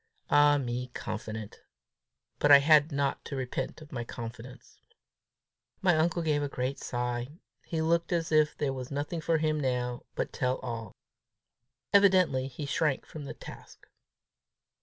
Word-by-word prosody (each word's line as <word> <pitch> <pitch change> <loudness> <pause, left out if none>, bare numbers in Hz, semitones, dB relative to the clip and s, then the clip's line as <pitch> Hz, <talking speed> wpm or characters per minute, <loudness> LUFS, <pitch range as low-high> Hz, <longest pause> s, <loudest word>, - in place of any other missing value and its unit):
Ah 145 0 +6
me, 125 -2 -3
confident! 110 -1 -6 0.8
But 145 - +4
I 140 - +12
had 150 +2 +5
not 140 -1 -1
to 140 - -5
repent 130 +3 -4
of 150 - -16
my 120 -4 -3
confidence! 120 +2 -9 1.0
My 180 -3 +3
uncle 165 +2 +1
gave 150 -2 +1
a 145 - -2
great 130 +1 -3
sigh. 125 +4 -3 0.3
He 160 -1 -1
looked 170 +1 +1
as 165 -2 0
if 155 -1 +3
there 140 -3 -1
was 130 -1 -6
nothing 145 +4 -3
for 165 +1 +2
him 155 -1 0
now 125 -3 -1
but - - -3
tell 125 0 0
all. 115 -4 -5 1.0
Evidently 185 -10 +5
he 135 +2 -6
shrank 145 0 0
from 150 -2 -9
the - - -7
task. - - -12
140 Hz, 150 wpm, -29 LUFS, 125-155 Hz, 1.0 s, I